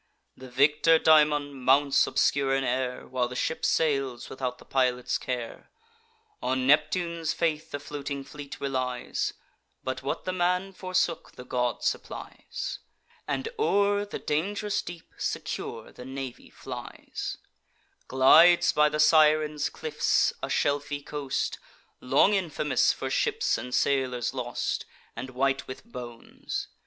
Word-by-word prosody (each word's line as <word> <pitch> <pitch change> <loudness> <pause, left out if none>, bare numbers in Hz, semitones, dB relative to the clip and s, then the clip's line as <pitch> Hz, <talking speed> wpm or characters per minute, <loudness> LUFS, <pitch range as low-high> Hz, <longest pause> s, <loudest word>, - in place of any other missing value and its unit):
The 130 0 -11
victor 150 +5 +4
daemon 150 -2 +4
mounts 135 +2 +3
obscure 135 -1 +2
in 135 - 0
air, 125 0 -2
While 125 -1 0
the 125 - -8
ship 160 - -2
sails 135 -6 0
without 125 -2 -3
the - - -16
pilot's 125 -2 0
care. 125 -2 -5 0.7
On 130 0 0
Neptune's 160 +3 +2
faith 160 -2 -1
the 145 - -4
floating 140 -1 -5
fleet 145 0 -9
relies; 130 -2 -2 0.5
But - - -3
what - - -3
the 185 - -1
man 180 +2 0
forsook, 185 -3 -1
the 125 - -10
god 125 -1 -1
supplies, - - -4 0.5
And - - -2
o'er 205 - +2
the 205 - -6
dang'rous 205 +7 -1
deep 175 -2 -10
secure 115 -2 -4
the - - -11
navy 130 -1 -7
flies; - - -7 0.7
Glides 160 +7 +6
by 150 0 +4
the 150 - -3
Sirens' 150 -1 +4
cliffs, 155 -1 +1
a - - -2
shelfy 145 0 0
coast, 145 -3 -2 0.4
Long 140 +10 +4
infamous 165 -6 +2
for - - -4
ships 460 -3 +1
and 125 - -5
sailors 130 -2 +1
lost, 120 -2 -3 0.3
And 130 - -6
white 135 +2 0
with 130 - -8
bones. 120 - -7
145 Hz, 130 wpm, -27 LUFS, 130-160 Hz, 0.7 s, Glides